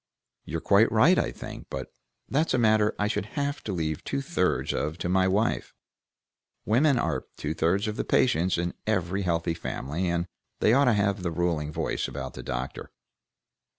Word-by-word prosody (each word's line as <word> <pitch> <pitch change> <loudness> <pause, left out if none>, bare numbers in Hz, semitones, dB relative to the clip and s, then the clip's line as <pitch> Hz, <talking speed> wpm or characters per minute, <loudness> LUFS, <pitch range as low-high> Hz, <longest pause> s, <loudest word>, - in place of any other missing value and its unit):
"You're - - -4
quite - - +4
right, - - +5
I - - 0
think, - - -9
but 65 -1 -6 0.3
that's 150 +2 +1
a - - +2
matter 110 -2 +3
I 105 - +1
should 105 -2 -2
have 145 0 -1
to 105 - -2
leave 80 -4 -2
two 140 0 -2
thirds 135 - 0
of 75 +2 -2
to 90 - -3
my 95 0 +3
wife: 105 +5 0 0.9
women 135 +5 +3
are - - -1
two 75 +1 -2
thirds 90 +6 +1
of 105 - -3
the - - 0
patients 95 -9 +2
in 85 +1 -1
every 95 -2 0
healthy 85 -2 0
family, 80 +1 -3
and 85 0 0 0.3
they 110 - +4
ought 140 +2 +5
to 125 - +4
have 100 -1 +1
the 90 - -1
ruling 80 -3 -1
voice 80 +1 -2
about 65 -2 -6
the - - -7
doctor." 65 +1 -5
95 Hz, 185 wpm, -27 LUFS, 85-110 Hz, 0.9 s, right